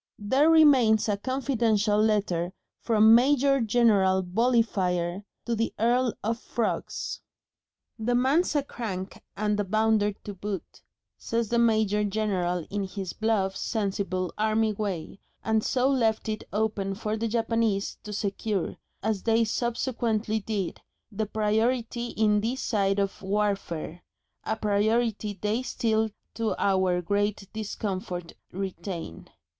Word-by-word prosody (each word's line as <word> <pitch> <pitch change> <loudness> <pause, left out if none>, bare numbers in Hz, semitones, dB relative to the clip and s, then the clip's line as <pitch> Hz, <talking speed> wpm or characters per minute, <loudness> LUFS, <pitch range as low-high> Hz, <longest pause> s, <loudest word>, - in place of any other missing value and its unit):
There 260 +9 +3
remains 265 -10 +5
a 205 - +2
confidential 225 -3 +1
letter 195 -5 +1 0.3
from 220 -1 +5
Major 275 +3 +4
General 210 -5 +3
Volleyfire 190 -4 +1 0.2
to 235 - 0
the 225 +1 -1
Earl 240 +2 +2
of 230 +2 -1
Frogs. 235 -1 -3 0.8
"The 240 +2 0
man's 275 +7 +2
a 290 - +2
crank 200 -8 -6 0.2
and 210 0 0
a - - +2
bounder 215 +1 +2
to 205 +1 -9
boot," 195 0 -6 0.4
says 230 -2 -1
the 235 - +2
Major 215 -3 +3
General 190 -5 -1
in 205 0 -1
his 190 -2 -5
bluff, 210 -4 0
sensible, 195 -4 -2
army 220 0 +2
way, 195 -3 -4 0.2
and 220 -1 +1
so 255 0 +1
left 230 -5 +1
it 215 0 -3
open 205 -2 -1
for 215 +1 -2
the 225 +1 -1
Japanese 225 -3 0
to 210 - -7
secure, 205 -1 -2 0.3
as 215 -2 0
they 225 0 +3
subsequently 230 -1 -1
did, 200 -3 -3 0.3
the 215 +1 -2
priority 225 +3 0
in 210 -2 +2
this 240 +5 -2
side 195 -3 +1
of 200 -1 -1
warfare 195 -5 -2 0.4
a 220 - 0
priority 215 0 0
they 210 +4 0
still 220 -3 0 0.2
to 225 -1 -1
our 185 -2 +2
great 205 +2 -1
discomfort 190 -5 -4 0.2
retain. 185 - -6
215 Hz, 130 wpm, -27 LUFS, 195-230 Hz, 0.8 s, remains